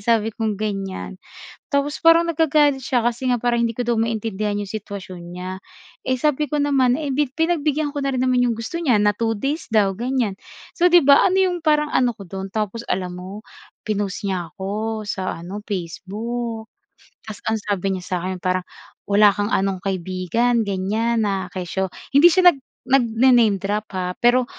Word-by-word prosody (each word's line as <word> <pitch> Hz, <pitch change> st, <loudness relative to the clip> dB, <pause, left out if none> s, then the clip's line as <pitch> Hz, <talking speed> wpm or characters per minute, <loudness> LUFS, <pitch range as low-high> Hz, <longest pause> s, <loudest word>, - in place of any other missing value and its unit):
sabi 225 Hz, +1 st, +1 dB
kong 220 Hz, -2 st, -2 dB
gan'yan 195 Hz, -2 st, -4 dB, 0.5 s
tapos 280 Hz, 0 st, -1 dB
parang 330 Hz, +1 st, +6 dB
nagagalit 300 Hz, -4 st, +2 dB
siya 240 Hz, -1 st, 0 dB
kasi 240 Hz, +2 st, 0 dB
nga 245 Hz, -, +2 dB
parang 235 Hz, 0 st, 0 dB
hindi 230 Hz, 0 st, -1 dB
ko 245 Hz, -, -1 dB
maintindihan 220 Hz, -2 st, -1 dB
'yong 205 Hz, -1 st, -4 dB
sitwasyon 195 Hz, -4 st, -7 dB, 0.2 s
niya, 185 Hz, +1 st, -5 dB, 0.5 s
eh, 260 Hz, 0 st, -1 dB
sabi 300 Hz, +2 st, 0 dB
ko 300 Hz, -, -1 dB
naman, 270 Hz, -3 st, +2 dB
eh, 295 Hz, -3 st, -3 dB
pi 290 Hz, 0 st, +1 dB
pinagbigyan 305 Hz, -1 st, 0 dB
ko 285 Hz, -, -3 dB
na 275 Hz, -, 0 dB
rin -, -, -1 dB
naman 255 Hz, -1 st, +2 dB
'yong 240 Hz, -2 st, +1 dB
gusto 285 Hz, +10 st, -4 dB
niya 250 Hz, -9 st, +3 dB
na 205 Hz, 0 st, +3 dB
2 225 Hz, +1 st, -1 dB
days 285 Hz, +8 st, -3 dB
daw 205 Hz, -4 st, +3 dB
gan'yan, 240 Hz, -1 st, -1 dB, 0.4 s
so, 355 Hz, 0 st, +3 dB
'di 345 Hz, -5 st, +6 dB
ba, 280 Hz, -1 st, +7 dB
ano 375 Hz, -, +1 dB
'yong 365 Hz, -2 st, +2 dB
parang 300 Hz, -1 st, +1 dB
ano 250 Hz, -2 st, +2 dB
ko 200 Hz, -, -10 dB
do'n 190 Hz, +2 st, -6 dB
tapos 215 Hz, +2 st, -3 dB
alam 180 Hz, -1 st, -2 dB
mo 200 Hz, +4 st, -9 dB, 0.4 s
pinost 205 Hz, -1 st, -2 dB
niya 180 Hz, -4 st, -2 dB
ako 215 Hz, +3 st, -4 dB
sa 190 Hz, -4 st, -3 dB
ano 200 Hz, +4 st, -6 dB
Facebook. 220 Hz, +5 st, -4 dB, 0.6 s
Tapos 215 Hz, -2 st, -8 dB
ang 220 Hz, -, +1 dB
sabi 200 Hz, -2 st, -2 dB
niya 180 Hz, -, -8 dB
sa 180 Hz, -, -2 dB
'kin 185 Hz, +1 st, -3 dB
parang 185 Hz, 0 st, -1 dB, 0.4 s
wala 205 Hz, 0 st, +6 dB
kang 205 Hz, +1 st, -2 dB
anong 195 Hz, -4 st, 0 dB
kaibigan 190 Hz, +6 st, 0 dB
gan'yan, 215 Hz, +4 st, 0 dB
na 190 Hz, -2 st, -2 dB
kesyo 185 Hz, +1 st, -2 dB, 0.2 s
hindi 285 Hz, +5 st, +8 dB
siya 360 Hz, 0 st, +6 dB
nag 275 Hz, -, -13 dB, 0.2 s
nagna 255 Hz, -1 st, +3 dB
name 225 Hz, -5 st, +4 dB
drop, 205 Hz, +3 st, -3 dB
ha, 180 Hz, -1 st, -2 dB
pero 245 Hz, +1 st, +4 dB
225 Hz, 185 wpm, -21 LUFS, 195-265 Hz, 0.6 s, hindi